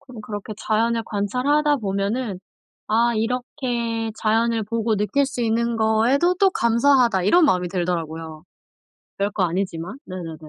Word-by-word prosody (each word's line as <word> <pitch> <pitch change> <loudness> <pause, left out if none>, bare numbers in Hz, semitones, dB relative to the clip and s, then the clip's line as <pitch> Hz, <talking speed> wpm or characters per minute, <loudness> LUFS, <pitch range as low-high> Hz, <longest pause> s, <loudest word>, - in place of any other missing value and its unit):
그럼 255 -5 -12
그렇게 210 0 -6
자연을 230 +2 0
관찰하다 255 +9 +1
보면은 200 -1 -2 0.5
'아 235 +2 +2
이렇게 235 -1 -2
자연을 225 +1 +1
보고 225 0 -1
느낄 210 +8 +1
수 255 -3 -4
있는 230 +1 0
거에도 230 +10 +2
또 385 +1 +3
감사하다.' 235 - +3
이런 345 - +5
마음이 180 -10 +2
들더라고요. 165 -3 -4 0.7
별 200 +1 0
거 195 - -1
아니지만. 180 +3 -3
네네네. 175 -4 -7
225 Hz, 320 characters per minute, -22 LUFS, 195-245 Hz, 0.7 s, 이런